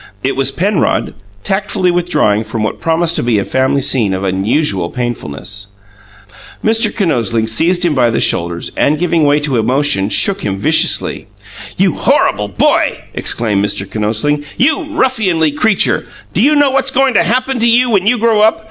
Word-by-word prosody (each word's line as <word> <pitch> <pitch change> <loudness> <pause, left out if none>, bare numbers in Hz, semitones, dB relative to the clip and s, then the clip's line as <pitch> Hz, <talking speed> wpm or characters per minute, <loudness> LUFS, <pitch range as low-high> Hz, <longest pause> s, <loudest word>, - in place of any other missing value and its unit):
It 135 - -1
was 135 -1 +1
Penrod, 175 - 0 0.3
tactfully 195 -2 0
withdrawing 170 -12 +1
from 110 0 -4
what 110 - -4
promised 165 +1 +1
to - - 0
be 120 -2 +1
a 100 - -1
family 130 +1 0
scene 115 -8 0
of 95 - -4
unusual 95 - -1
painfulness. 100 - -5 1.0
Mr. 220 0 +2
Kinosling 120 - -1
seized 175 +10 +1
him 170 - +1
by 125 -4 +2
the 115 - -1
shoulders 85 0 -1
and, 150 +2 +1
giving 170 -1 +1
way 145 +1 +3
to 140 -4 -1
emotion, 125 -2 +1
shook 200 - +3
him 100 - -3
viciously. 155 +10 0 0.5
"You - - +1
horrible 105 +1 +1
boy!" 100 - +1 0.2
exclaimed 105 -4 -1
Mr. 100 -1 -3
Kinosling. 110 +9 -2
"You 300 +6 +1
ruffianly 185 - +1
creature! 210 +8 +1 0.3
Do - - +1
you 300 +2 +4
know 290 -2 +3
what's 270 0 +1
going 265 0 +1
to 200 - +3
happen 255 +6 -1
to 235 - +2
you 240 +1 +3
when 200 -2 +1
you 245 +3 +3
grow 225 -2 +2
up? 220 +1 +3
150 Hz, 170 wpm, -14 LUFS, -, 1.0 s, you